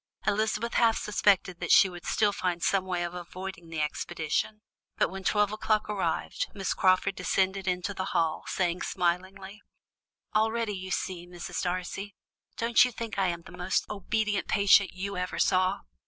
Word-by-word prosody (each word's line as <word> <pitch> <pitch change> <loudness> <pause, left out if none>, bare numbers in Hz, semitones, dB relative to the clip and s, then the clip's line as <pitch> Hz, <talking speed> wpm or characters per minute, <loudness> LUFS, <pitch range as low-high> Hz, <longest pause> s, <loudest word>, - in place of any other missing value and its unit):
Elizabeth 215 +2 0
half 230 -1 +4
suspected 195 -4 +2
that 175 - -2
she - - +8
would 175 -2 -9
still 210 -1 +2
find 180 -3 -2
some 195 -1 +2
way 180 -2 -1
of 175 0 -4
avoiding 180 -1 -7
the 165 -1 -4
expedition, 160 +7 -2 0.3
but - - +2
when 190 0 -7
twelve 210 0 +2
o'clock 215 0 0
arrived, 190 -6 -1
Miss 195 -2 -1
Crawford 185 0 +3
descended 190 0 0
into 180 +2 -1
the 185 -1 -3
hall, 165 -1 0
saying 180 -1 -1
smilingly: 190 +3 -2 0.7
"All 220 +1 +3
ready, 230 -2 -1
you 185 0 -6
see, 180 -2 -3
Mrs. 175 -1 -5
Darcy. 185 +2 -3 0.4
Don't 230 0 +5
you 250 - 0
think 225 -3 -5
I 190 - +3
am 170 -1 -3
the - - -13
most 180 +1 -1
obedient 210 0 -1
patient 200 -1 +5
you 195 +1 -5
ever 180 0 -3
saw? 185 0 +2
190 Hz, 170 wpm, -28 LUFS, 180-210 Hz, 0.7 s, she